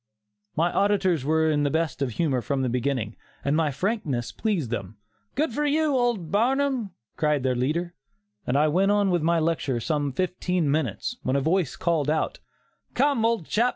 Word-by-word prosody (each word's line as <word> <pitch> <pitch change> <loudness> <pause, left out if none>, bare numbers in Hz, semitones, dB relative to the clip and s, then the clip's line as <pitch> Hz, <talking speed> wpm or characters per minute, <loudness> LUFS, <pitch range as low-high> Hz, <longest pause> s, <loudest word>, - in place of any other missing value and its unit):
'" 105 0 -55
My 170 +2 +1
auditors 190 -6 +2
were 160 +2 +2
in 145 -1 +1
the 145 - +2
best 160 -2 -1
of 130 -4 -1
humor 140 -5 0
from 135 +1 -1
the 130 - 0
beginning, 125 -3 -1 0.3
and 140 +2 +2
my 160 -1 +2
frankness 145 - -2
pleased 180 - -1
them. 105 -3 -4 0.4
"Good 285 -2 0
for 295 - -1
you, 300 0 +2
old 240 -9 0
Barnum," 255 +1 +1 0.3
cried 150 -3 +1
their 130 -1 +2
leader; 160 +8 -1 0.5
and 125 - +2
I 150 +2 +4
went 185 +6 +2
on 205 -2 +3
with 175 -2 +2
my 170 +2 +2
lecture 160 -5 0
for - - -1
some 145 0 -1
fifteen 180 -1 0
minutes, 155 - -1
when 130 - -1
a - - +3
voice 160 +1 +1
called 165 -4 0
out: 155 0 0 0.6
"Come, 275 -3 +2
old 230 -7 +1
chap! 235 +8 +2
160 Hz, 190 wpm, -25 LUFS, 140-205 Hz, 0.6 s, I